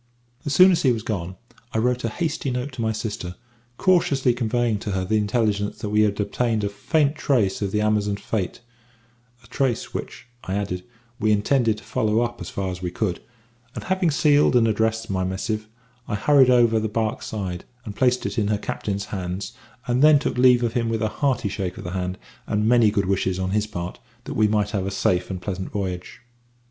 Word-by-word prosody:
As 145 - 0
soon 185 +1 +8
as 175 - +2
he 130 - +4
was 115 -3 -2
gone, 95 -5 -3 0.4
I - - 0
wrote 125 +2 +1
a 115 - 0
hasty 155 +2 -2
note 125 +3 -3
to 130 -3 -6
my 110 -1 +1
sister, 105 -5 -4 0.4
cautiously 140 -9 +3
conveying 120 -2 0
to 105 -1 -4
her 95 -1 -1
the 110 +3 +1
intelligence 105 -1 0
that 105 - -5
we 105 0 +4
had 105 -1 +1
obtained 110 +1 0
a 100 - 0
faint 145 +8 +1
trace 115 -11 +1
of 100 -2 -1
the 105 - +1
Amazons 105 -1 +1
fate; 105 +1 -3 0.8
a - - -18
trace 130 0 -1
which, - - -6 0.2
I 95 - -3
added, 95 -3 -3 0.4
we 110 -1 +2
intended 110 +1 +2
to 110 - -12
follow 110 -1 +1
up 120 -4 -3
as 85 - -5
far 95 -1 -3
as 90 0 -7
we 90 - -2
could, 90 0 -2 0.5
and - - -5
having 185 -2 +1
sealed 145 -2 +4
and 115 -2 +5
addressed 110 0 0
my 95 -1 0
missive, 105 +4 -3 0.4
I 105 - -2
hurried 135 +4 +5
up 125 - +6
over 115 -1 +3
the 110 0 -2
barque's 110 +1 -2
side, 95 -5 -4 0.2
and 105 -2 -7
placed 125 0 +2
it - - -1
in 105 - +1
her 105 0 +1
captain's 100 -1 -3
hands, 95 0 -4 0.3
and 125 +1 +1
then 155 0 +7
took 140 - -2
leave 125 -1 +5
of 115 -1 0
him 115 -2 0
with 115 0 -1
a 110 - +1
hearty 130 -4 0
shake 95 -2 -4
of - - -7
the 90 - -5
hand 90 0 -3 0.3
and 105 +1 0
many 120 -2 +5
good 100 -2 0
wishes 95 -1 0
on 95 0 -2
his 105 +1 +1
part 90 -3 -6 0.2
that - - -6
we 110 0 +3
might 105 -1 0
have 95 -3 -1
a - - 0
safe 90 -2 0
and 95 -2 -5
pleasant 95 0 -4
voyage. 95 +3 -5
110 Hz, 215 wpm, -23 LUFS, 100-120 Hz, 0.8 s, soon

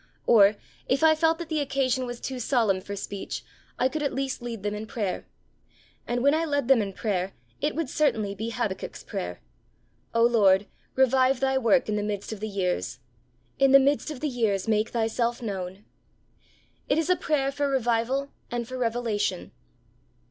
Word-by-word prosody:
Or, 210 -3 +6 0.3
if 270 +3 +1
I 320 0 +7
felt 325 +1 +2
that 340 -1 -6
the 315 -2 0
occasion 260 -2 0
was 240 -1 -6
too 260 -1 -5
solemn 220 -6 +1
for 200 +2 -6
speech, 200 0 -5 0.3
I 255 - +3
could 305 +3 -3
at 285 - -1
least 270 -2 -2
lead 230 -4 -6
them 205 0 -1
in 210 +1 -5
prayer. 205 -5 -3 0.8
And 240 +1 -1
when 280 +1 +5
I 320 +1 +1
led 285 -5 0
them 265 -4 +5
in 200 -1 -3
prayer, 195 -2 -2 0.3
it 295 +1 0
would 325 -2 -1
certainly 220 -8 +1
be 220 +3 -4
Habakkuk's 230 -5 -4
prayer: 90 -5 -5 0.7
'O 230 - +4
Lord, 205 -5 +5 0.3
revive 260 0 +4
Thy 265 0 +1
work 255 +2 +3
in 210 -1 0
the - - 0
midst 205 0 -3
of 215 - -8
the 215 +1 -4
years; 180 - -2 0.6
in 270 0 +5
the 275 - +10
midst 280 +3 +1
of 300 -5 -7
the 305 - 0
years 225 -7 0
make 215 0 +2
Thyself 235 +1 0
known!' 195 -3 -5 1.0
It 285 - +3
is 325 +2 +1
a - - +5
prayer 275 -5 0
for 285 0 -1
revival 260 +2 0 0.2
and 240 -1 -3
for 255 +1 -6
revelation. 225 - -1
240 Hz, 185 wpm, -26 LUFS, 210-275 Hz, 1.0 s, the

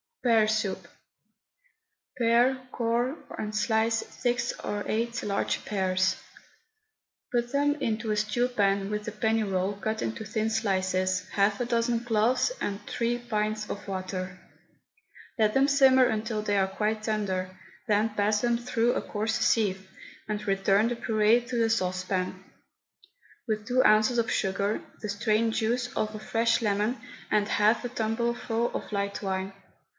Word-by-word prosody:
PEAR 225 -3 +4
SOUP. 215 -2 -1 1.3
Pare, 240 +2 +3
core, 240 +3 0 0.2
and 215 0 -4
slice 220 +1 +2 0.2
six 245 -1 0
or 205 0 -2
eight 235 +2 -1
large 200 -1 -1
pears. 185 -2 +1 1.2
Put 240 0 0
them 290 +1 +2
into 220 -5 -2
a - - +1
stew 215 +4 +1
pan 200 -4 +1
with 210 0 -3
a - - -2
penny 220 +1 +1
roll 195 -1 0
cut 220 +2 -3
into 115 - -3
thin 220 +1 -1
slices, 185 -3 0
half 200 0 +1
a 245 - 0
dozen 235 -1 +1
cloves, 240 - +2
and 200 0 -3
three 235 0 -1
pints 215 -2 -2
of 205 - -6
water. 185 -1 -4 1.0
Let 215 -1 +3
them 270 +1 +4
simmer 265 -2 +6
until 220 -1 -1
they 205 -1 +1
are 190 -1 +3
quite 215 +2 -2
tender, 190 -4 -2 0.3
then 215 +1 +2
pass 210 0 +1
them 240 -1 +2
through 240 0 +1
a - - -1
coarse 215 +1 -2
sieve, 190 -4 +1 0.4
and 210 0 -4
return 195 +2 +3
the 240 - -1
puree 225 0 +3
to 245 +1 -6
the 230 -1 +2
saucepan, 185 -2 -1 1.0
with 215 -1 -2
two 255 +1 +3
ounces 220 +2 +4
of 230 - 0
sugar, 200 +1 0 0.2
the 210 - -4
strained 220 +2 +1
juice 240 +3 0
of 215 0 -1
a 215 - -6
fresh 230 +2 +1
lemon, 210 +3 0 0.3
and 210 -1 +2
half 215 +3 +2
a - - -2
tumblerful 235 0 -1
of - - -5
light 200 -1 -2
wine. 190 0 -2
215 Hz, 150 wpm, -28 LUFS, 200-235 Hz, 1.3 s, simmer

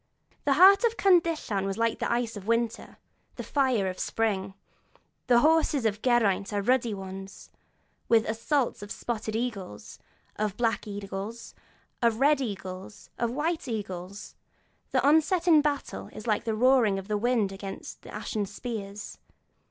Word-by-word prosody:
The 285 - +4
heart 385 - +7
of 465 -1 +2
Cyndyllan 330 - +2
was 195 0 -3
like 230 0 0
the - - -1
ice 235 -1 -1
of 205 0 -9
winter, 230 0 0
like - - -20 0.4
the - - -6
fire 260 -8 +1
of 185 0 -5
spring; 195 -4 -1 0.7
the 240 -2 +5
horses 310 -4 +3
of 210 -1 0
Geraint 220 -5 +2
are 205 -1 -1
ruddy 245 0 +2
ones, 195 0 -9 0.6
with 225 -1 +5
the - - -2
assault 240 +3 -1
of 205 - -8
spotted 220 -2 -4
eagles, 205 - -5 0.4
of 210 -2 -2
black 230 -1 0
eagles, 205 +2 -6 0.5
of 230 -2 +2
red 285 +1 +4
eagles, 190 -3 -7
of 235 - +1
white 310 +5 -2
eagles; 200 -3 -6 0.6
an - - +2
onset 320 +4 +3
in 315 -3 +7
battle 280 - -3
is 215 - -9
like 220 0 0
the 220 -1 -1
roaring 240 -4 +4
of 195 0 -6
the 210 - -1
wind 220 -2 +1
against 195 0 -8
the - - -12
ashen 210 -1 -3
spears. 205 -1 -7
225 Hz, 160 wpm, -27 LUFS, 200-260 Hz, 0.7 s, heart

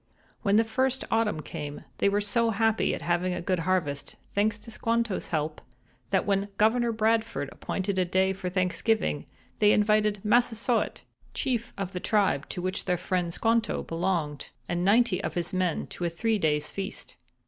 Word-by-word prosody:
"When 200 0 +2
the 225 - +6
first 260 +3 0
autumn 210 -9 +1
came 145 0 -6 0.2
they 200 - +4
were 205 +1 +1
so 230 +3 +2
happy 225 0 +2
at - - -8
having 175 +1 +1
a - - -3
good 185 -1 0
harvest, 165 -5 -1 0.2
thanks 210 +1 +2
to 220 +2 -11
Squanto's 230 -2 -1
help, 155 -1 -2 0.5
that - - +2
when 200 0 +1
Governor 230 +2 +3
Bradford 225 -7 0
appointed 190 0 -2
a - - +4
day 190 +2 +2
for 190 -1 -4
Thanksgiving 185 -1 0 0.3
they 210 -1 +6
invited 210 -1 +2
Massasoit, 235 +1 +1 0.3
chief 240 -3 -1
of 195 -2 -3
the 180 - -4
tribe 195 -8 +1
to 180 - -4
which 185 0 -2
their 180 -1 +1
friend 180 -1 -1
Squanto 225 +4 +1
belonged, 165 -4 -2 0.2
and 175 0 -1
ninety 205 -1 +3
of - - -3
his 175 +2 -2
men 185 -3 0
to - - -6
a - - +1
three 215 +6 0
days' 150 -3 0
feast. 195 +1 -6
200 Hz, 170 wpm, -28 LUFS, 180-225 Hz, 0.5 s, the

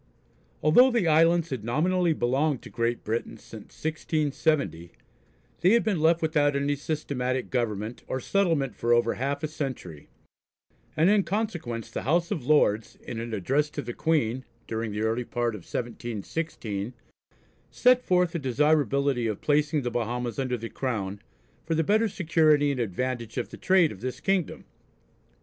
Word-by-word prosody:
Although 245 - +7
the 235 -8 +1
islands 165 +1 +4
had 125 -5 -3
nominally 170 +9 +1
belonged 135 +1 0
to - - -11
Great 115 0 -1
Britain 115 +1 -3
since 110 -1 -13
1670, 155 - -1 0.7
they 175 - +4
had 235 - +4
been 205 -6 0
left 165 +1 +3
without 150 -3 +2
any 140 +1 +1
systematic 130 -4 -3
government 115 -2 -2
or 130 - -2
settlement 160 - 0
for 120 0 +1
over 120 -1 +3
half 140 +3 -3
a - - +1
century, 130 - -6 0.9
and 160 +3 +4
in 210 -1 +4
consequence 175 - -3
the - - -3
House 170 +6 +1
of 150 - -2
Lords 120 -6 +2
in 115 -2 -6
an 115 0 -5
address 135 +9 0
to - - -5
the 120 +1 -5
Queen 130 -6 0 0.2
during 110 -1 -3
the 105 +1 -3
early 115 +2 0
part 120 -1 -2
of 105 - -6
1716, 115 - -4 0.8
set 250 0 +4
forth 180 -2 +2
the 170 - -3
desirability 140 -2 +1
of 105 -3 -3
placing 150 0 +1
the 120 - -2
Bahamas 120 0 -2
under 130 -2 -1
the 115 0 -6
Crown, 105 -6 -3 0.4
for 165 - -1
the 160 - +2
better 215 +6 +2
security 155 -5 +3
and 135 - -3
advantage 120 +2 -3
of 125 - -2
the - - -9
trade 185 -4 +3
of 95 - -11
this 125 0 -4
kingdom. 190 0 -1
135 Hz, 160 wpm, -27 LUFS, 115-160 Hz, 0.9 s, Although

